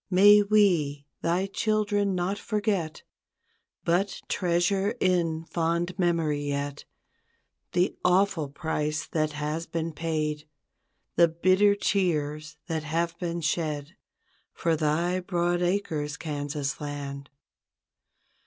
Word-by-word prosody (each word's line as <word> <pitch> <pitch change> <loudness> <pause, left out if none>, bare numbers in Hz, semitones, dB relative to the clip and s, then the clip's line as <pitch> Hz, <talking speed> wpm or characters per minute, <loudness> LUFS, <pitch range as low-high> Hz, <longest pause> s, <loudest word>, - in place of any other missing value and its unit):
May 205 +2 +7
we, 175 -9 +2 0.2
thy 175 +3 +1
children 205 -1 0
not 185 +3 -1
forget. 205 -8 -1 0.8
But 180 +4 0
treasure 190 +4 +1
in 165 -3 +1
fond 170 +2 -1
memory 165 -5 +1
yet. 145 0 -3 0.9
The 180 +1 +2
awful 180 -4 +2
price 150 +1 -2
that 155 -2 -1
has 150 +3 -3
been 165 -1 -3
paid. 155 -1 -2 0.7
The 170 - +7
bitter 185 +5 +3
tears 155 -7 -1
that 160 -3 -2
have 165 +2 -1
been 170 -1 -3
shed 150 0 -2 0.6
For 165 -2 +1
thy 160 +4 +1
broad 175 -1 0
acres, 160 -6 -1
Kansas 145 -2 -3
Land. 140 -1 -5
170 Hz, 105 wpm, -27 LUFS, 150-185 Hz, 0.9 s, May